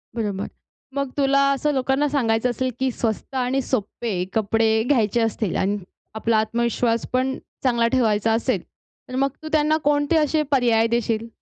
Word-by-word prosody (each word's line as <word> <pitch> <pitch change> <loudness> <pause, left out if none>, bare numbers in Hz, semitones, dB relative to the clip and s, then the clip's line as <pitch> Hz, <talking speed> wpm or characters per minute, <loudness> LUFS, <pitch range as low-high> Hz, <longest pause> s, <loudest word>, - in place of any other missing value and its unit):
बरोबर. 205 -4 -2 0.5
मग 280 -1 -1
तुला 275 0 +3
असं 295 +2 0
लोकांना 270 +2 +1
सांगायचं 245 -4 +1
असेल, 255 +2 -1
की 265 0 +1
स्वस्त 230 +3 -3
आणि 260 +1 0
सोपे 220 -5 -2
कपडे 220 +1 +2
घ्यायचे 235 -4 +2
असतील 220 -3 -1
आणि 200 +2 0 0.4
आपला 220 +1 +1
आत्मविश्वास 230 +1 0
पण 260 +1 +1 0.3
चांगला 235 -3 +2
ठेवायचा 225 -3 +2
असेल. 225 - 0 0.5
तर 255 - -5
मग 275 +1 +2
तू - - -6
त्यांना 310 0 +3
कोणते 290 +2 +2
असे 305 0 +2
पर्याय 235 -4 +3
देशील? 230 -1 -1
240 Hz, 150 wpm, -22 LUFS, 225-270 Hz, 0.5 s, तुला